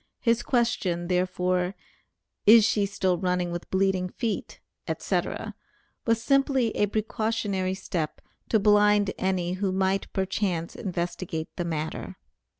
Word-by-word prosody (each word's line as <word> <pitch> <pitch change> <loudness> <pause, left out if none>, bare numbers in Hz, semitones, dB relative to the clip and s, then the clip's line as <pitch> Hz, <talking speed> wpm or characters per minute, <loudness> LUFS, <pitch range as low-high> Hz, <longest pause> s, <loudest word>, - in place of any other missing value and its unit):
His 230 -1 +2
question, 185 -8 0
therefore, 180 0 0 0.7
"is 220 0 +9
she 210 -3 +2
still 190 -3 0
running 180 -1 0
with 175 0 -5
bleeding 190 -1 +1
feet," 225 +2 -4 0.3
etc., - - -2 0.5
was 230 0 +3
simply 270 -2 +2
a 205 - +2
precautionary 210 -3 -1
step 170 -5 -3 0.3
to 220 - +4
blind 210 -1 +4
any 185 -2 0
who 190 +1 -1
might 190 +1 0
perchance 190 -3 -1
investigate 175 -3 -3
the 175 - -2
matter. 160 -2 -4
190 Hz, 120 wpm, -26 LUFS, 180-210 Hz, 0.7 s, is